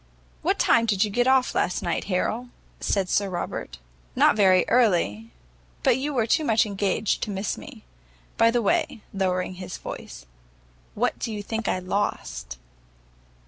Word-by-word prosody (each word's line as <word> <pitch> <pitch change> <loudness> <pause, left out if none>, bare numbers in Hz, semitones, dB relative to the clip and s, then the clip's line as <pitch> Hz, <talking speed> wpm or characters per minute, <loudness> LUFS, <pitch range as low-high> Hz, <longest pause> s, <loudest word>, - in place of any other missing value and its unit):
"What - - +1
time 230 0 +3
did 200 -2 +3
you 210 - -2
get 245 +4 +1
off 260 -1 +3
last 180 - 0
night, 170 - -1
Harrel?" 220 +6 -1 0.3
said 195 -3 0
Sir 200 +2 +1
Robert. 175 - -5 0.4
"Not - - +5
very 190 -3 +5
early; 175 - +2 0.5
but - - +4
you 275 +4 -2
were 245 -6 +1
too 315 +8 +2
much 225 -6 +3
engaged 200 0 -1
to - - -2
miss 195 0 -2
me. - - -11 0.5
By 230 - +5
the 235 0 +1
way," 210 +2 0
lowering 185 -1 -1
his 180 -1 -6
voice, - - -8 0.7
"what - - 0
do 230 - -3
you 210 -1 -5
think 225 +1 -3
I - - +1
lost?" 65 - -3
205 Hz, 160 wpm, -25 LUFS, 185-230 Hz, 0.7 s, Not